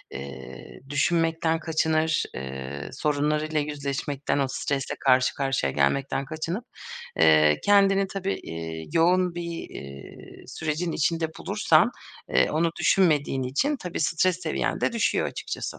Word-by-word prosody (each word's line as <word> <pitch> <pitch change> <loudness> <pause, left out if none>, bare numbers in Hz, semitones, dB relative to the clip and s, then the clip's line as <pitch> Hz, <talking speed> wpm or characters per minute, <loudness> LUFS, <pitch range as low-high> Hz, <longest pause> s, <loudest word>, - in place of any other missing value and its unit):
ııı, 70 - -10
düşünmekten 165 +2 +1
kaçınır, 160 -1 +1
ııı, 65 +2 -6
sorunlarıyla 150 +2 0
yüzleşmekten, 145 -1 -2
o 140 - +2
stresle 135 0 -2
karşı 130 -1 +3
karşıya 135 - 0
gelmekten 135 - 0
kaçınıp, 165 - -4 0.5
eee, 75 -1 +5
kendini 195 -1 +4
tabii, 195 0 -3
iii, 80 -1 -6
yoğun 180 +1 +3
bir, 175 - -4 0.3
iii, 70 0 -11
sürecin 160 +2 -2
içinde 165 +1 0
bulursan, - - +3 0.4
ııı, 65 - +3
onu 165 +2 +2
düşünmediğin 150 -8 +2
için 140 - 0
tabii 180 -8 -5
stres 170 +3 +1
seviyen - - -1
de - - +1
düşüyor 230 -2 +1
açıkçası. - - -5
150 Hz, 120 wpm, -25 LUFS, 130-170 Hz, 0.5 s, eee